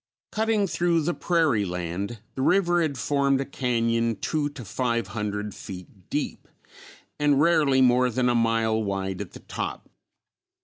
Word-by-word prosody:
Cutting 220 Hz, -1 st, +1 dB
through 170 Hz, -3 st, +1 dB
the 175 Hz, +3 st, 0 dB
prairie 160 Hz, -14 st, +2 dB
land 90 Hz, +4 st, -4 dB
the 130 Hz, -, -4 dB
river 175 Hz, +2 st, +3 dB
had 150 Hz, -5 st, -1 dB
formed 140 Hz, +1 st, +1 dB
a 135 Hz, -, -1 dB
cañon 115 Hz, -3 st, 0 dB
two 150 Hz, -2 st, -1 dB
to 140 Hz, -5 st, -10 dB
five 115 Hz, 0 st, -1 dB
hundred 105 Hz, -1 st, -3 dB
feet 90 Hz, 0 st, -11 dB
deep -, -, -3 dB, 0.7 s
and 145 Hz, -2 st, +3 dB
rarely 150 Hz, -4 st, +4 dB
more 125 Hz, 0 st, +4 dB
than 125 Hz, +1 st, 0 dB
a 120 Hz, -, +3 dB
mile 115 Hz, -1 st, +2 dB
wide 95 Hz, -2 st, -3 dB
at -, -, -8 dB
the -, -, -11 dB
top. -, -, -5 dB
125 Hz, 150 wpm, -25 LUFS, 105-150 Hz, 0.7 s, rarely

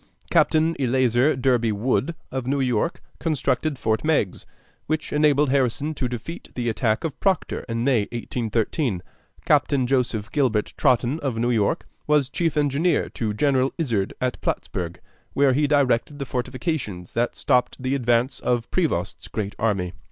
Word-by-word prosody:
Captain 160 Hz, +1 st, +3 dB
Eleazer 130 Hz, +2 st, +3 dB
Derby 125 Hz, -3 st, +2 dB
Wood, 130 Hz, +9 st, 0 dB, 0.2 s
of 130 Hz, -1 st, -3 dB
New 140 Hz, +1 st, +1 dB
York, 125 Hz, +4 st, 0 dB, 0.2 s
constructed 150 Hz, -2 st, 0 dB
Fort 110 Hz, -2 st, 0 dB
Meigs, 150 Hz, -, 0 dB, 0.4 s
which 155 Hz, 0 st, -2 dB
enabled 150 Hz, -2 st, +3 dB
Harrison 140 Hz, +3 st, +1 dB
to 135 Hz, -4 st, -2 dB
defeat 125 Hz, +8 st, -7 dB
the 120 Hz, -2 st, -1 dB
attack 110 Hz, -1 st, 0 dB
of 155 Hz, -3 st, -4 dB
Proctor 195 Hz, -2 st, 0 dB
in 115 Hz, 0 st, -1 dB
May, 125 Hz, -6 st, +3 dB
1813. 115 Hz, -, -1 dB, 0.4 s
Captain 135 Hz, -3 st, +3 dB
Joseph 120 Hz, -4 st, 0 dB
Gilbert 125 Hz, -8 st, +1 dB
Totten, 125 Hz, +4 st, +2 dB
of 135 Hz, -7 st, -2 dB
New 120 Hz, +2 st, +1 dB
York, 105 Hz, -4 st, +1 dB, 0.2 s
was 150 Hz, -3 st, +3 dB
chief 165 Hz, 0 st, -1 dB
engineer 150 Hz, +4 st, +2 dB
to 110 Hz, -2 st, -2 dB
General 135 Hz, +3 st, +1 dB
Izard 115 Hz, -, -1 dB
at 125 Hz, 0 st, -2 dB
Plattsburg, 85 Hz, -1 st, -3 dB, 0.3 s
where 140 Hz, -1 st, +4 dB
he 145 Hz, +2 st, +2 dB
directed 140 Hz, -1 st, +2 dB
the 140 Hz, -, -4 dB
fortifications 125 Hz, -, -3 dB
that 120 Hz, +1 st, 0 dB
stopped 125 Hz, -3 st, +1 dB
the 130 Hz, +1 st, -1 dB
advance 120 Hz, 0 st, +1 dB
of 120 Hz, -2 st, -1 dB
Prevost's 100 Hz, -, -1 dB
great 105 Hz, -2 st, -3 dB
army. 95 Hz, -5 st, 0 dB
130 Hz, 150 wpm, -24 LUFS, 115-145 Hz, 0.4 s, where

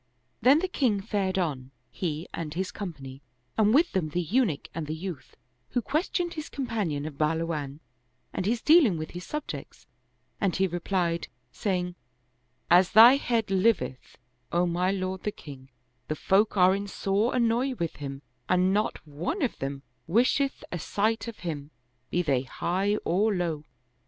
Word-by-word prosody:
Then 265 Hz, +4 st, +6 dB
the 370 Hz, +4 st, 0 dB
king 250 Hz, -, +1 dB
fared 195 Hz, -1 st, -1 dB
on, 140 Hz, -8 st, -2 dB, 0.2 s
he 160 Hz, -2 st, -3 dB
and 160 Hz, -2 st, -5 dB
his 190 Hz, +1 st, -2 dB
company, 140 Hz, -9 st, -7 dB, 0.3 s
and 215 Hz, -1 st, +4 dB
with 315 Hz, +8 st, +4 dB
them 175 Hz, -5 st, -1 dB
the 175 Hz, -, -1 dB
Eunuch 195 Hz, -, +1 dB
and 165 Hz, -2 st, -4 dB
the 155 Hz, -, -3 dB
youth, 170 Hz, -3 st, -7 dB, 0.3 s
who 245 Hz, -, 0 dB
questioned 345 Hz, -, -1 dB
his 310 Hz, -2 st, -6 dB
companion 210 Hz, -, -2 dB
of 150 Hz, -3 st, -7 dB
Bahluwan 155 Hz, -2 st, -1 dB, 0.5 s
and 185 Hz, -, -2 dB
his 230 Hz, +1 st, 0 dB
dealing 300 Hz, -, +6 dB
with 155 Hz, 0 st, -5 dB
his 180 Hz, +1 st, -8 dB
subjects, 300 Hz, -1 st, -6 dB, 0.5 s
and 195 Hz, -4 st, +1 dB
he 190 Hz, -, +2 dB
replied, 175 Hz, -1 st, -1 dB, 0.2 s
saying, 180 Hz, -, -1 dB, 0.4 s
" 125 Hz, +1 st, -22 dB
As 185 Hz, -, -6 dB
thy 235 Hz, +5 st, +9 dB
head 230 Hz, -7 st, -1 dB
liveth, 185 Hz, -, 0 dB, 0.3 s
O 175 Hz, +1 st, +2 dB
my 175 Hz, +1 st, +1 dB
lord 190 Hz, -1 st, -2 dB
the 210 Hz, -, -2 dB
king, 135 Hz, -7 st, -12 dB, 0.4 s
the 155 Hz, -, -2 dB
folk 200 Hz, +6 st, +2 dB
are 185 Hz, +1 st, +6 dB
in 200 Hz, +1 st, -4 dB
sore 200 Hz, +5 st, 0 dB
annoy 245 Hz, +2 st, +2 dB
with 170 Hz, -7 st, -3 dB
him 140 Hz, -1 st, -6 dB, 0.3 s
and 180 Hz, +1 st, +3 dB
not 210 Hz, -4 st, -1 dB
one 165 Hz, -, -3 dB
of 255 Hz, -, -1 dB
them 135 Hz, 0 st, -4 dB, 0.2 s
wisheth 255 Hz, -, +2 dB
a 175 Hz, -, -3 dB
sight 220 Hz, +8 st, 0 dB
of 230 Hz, -, -8 dB
him, 145 Hz, -4 st, -4 dB, 0.4 s
be 175 Hz, -, +1 dB
they 135 Hz, -6 st, +2 dB
high 185 Hz, +9 st, -1 dB
or 205 Hz, +4 st, +2 dB
low." 165 Hz, -4 st, -2 dB
185 Hz, 165 wpm, -27 LUFS, 155-220 Hz, 0.5 s, thy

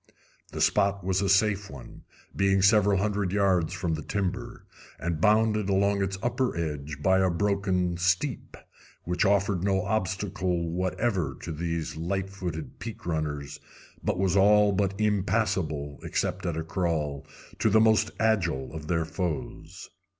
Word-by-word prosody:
The -, -, -5 dB
spot 100 Hz, -1 st, +2 dB
was 95 Hz, +1 st, 0 dB
a 100 Hz, -, 0 dB
safe 100 Hz, 0 st, +2 dB
one, 70 Hz, -3 st, -12 dB, 0.3 s
being 95 Hz, -1 st, +2 dB
several 100 Hz, -1 st, +5 dB
hundred 100 Hz, -1 st, 0 dB
yards 95 Hz, -5 st, +2 dB
from 85 Hz, -3 st, -2 dB
the 80 Hz, -, -3 dB
timber, 100 Hz, -1 st, -4 dB, 0.3 s
and 85 Hz, 0 st, -3 dB
bounded 105 Hz, 0 st, +3 dB
along 100 Hz, +1 st, +2 dB
its 95 Hz, 0 st, -1 dB
upper 120 Hz, -3 st, 0 dB
edge 75 Hz, -2 st, -4 dB
by 95 Hz, 0 st, +4 dB
a 95 Hz, -1 st, +3 dB
broken 90 Hz, -1 st, 0 dB
steep, 90 Hz, +10 st, -1 dB, 0.5 s
which 90 Hz, +4 st, 0 dB
offered 100 Hz, -2 st, +2 dB
no 95 Hz, -2 st, +1 dB
obstacle 95 Hz, -4 st, -1 dB
whatever 90 Hz, -, -1 dB
to 85 Hz, -, -5 dB
these 80 Hz, 0 st, -3 dB
light 95 Hz, +3 st, -2 dB
footed 95 Hz, -, -6 dB
peak 115 Hz, -2 st, -8 dB
runners, 75 Hz, -3 st, -3 dB, 0.4 s
but -, -, 0 dB
was 95 Hz, -1 st, +1 dB
all 105 Hz, +1 st, +5 dB
but 100 Hz, 0 st, -1 dB
impassable, 95 Hz, -8 st, 0 dB
except 95 Hz, -1 st, -2 dB
at 85 Hz, -2 st, -2 dB
a 80 Hz, -, -2 dB
crawl, 80 Hz, -5 st, -2 dB, 0.3 s
to -, -, +3 dB
the 110 Hz, +2 st, +5 dB
most 110 Hz, 0 st, +4 dB
agile 85 Hz, -13 st, 0 dB
of 80 Hz, -1 st, -7 dB
their 80 Hz, -1 st, 0 dB
foes. 85 Hz, -1 st, -5 dB
95 Hz, 150 wpm, -27 LUFS, 85-100 Hz, 0.5 s, several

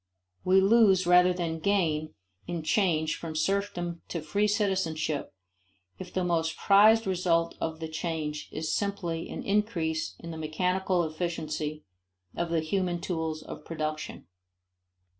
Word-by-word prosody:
We 185 Hz, +1 st, +5 dB
lose 195 Hz, -3 st, +5 dB
rather 180 Hz, +1 st, +6 dB
than 170 Hz, -2 st, -2 dB
gain 160 Hz, -5 st, 0 dB, 0.3 s
in 170 Hz, -2 st, -3 dB
change 160 Hz, -4 st, +1 dB
from 160 Hz, -2 st, -6 dB
serfdom 175 Hz, -1 st, -1 dB
to 170 Hz, -, -3 dB
free 200 Hz, +7 st, +1 dB
citizenship 185 Hz, -8 st, 0 dB, 0.7 s
if -, -, -8 dB
the 185 Hz, -, -1 dB
most 165 Hz, -2 st, 0 dB
prized 215 Hz, +3 st, +6 dB
result 175 Hz, -3 st, +1 dB
of 160 Hz, 0 st, -2 dB
the 160 Hz, -, -4 dB
change 155 Hz, -2 st, -4 dB
is 155 Hz, +1 st, -2 dB
simply 185 Hz, -5 st, -2 dB
an -, -, -5 dB
increase 180 Hz, -7 st, 0 dB
in 170 Hz, -, -8 dB
the 160 Hz, -, -6 dB
mechanical 180 Hz, +3 st, 0 dB
efficiency 155 Hz, -2 st, -3 dB, 0.5 s
of 170 Hz, 0 st, -2 dB
the 165 Hz, -1 st, +1 dB
human 175 Hz, +1 st, -1 dB
tools 160 Hz, -3 st, -3 dB
of -, -, -9 dB
production. 155 Hz, -1 st, -4 dB
170 Hz, 135 wpm, -28 LUFS, 160-190 Hz, 0.7 s, rather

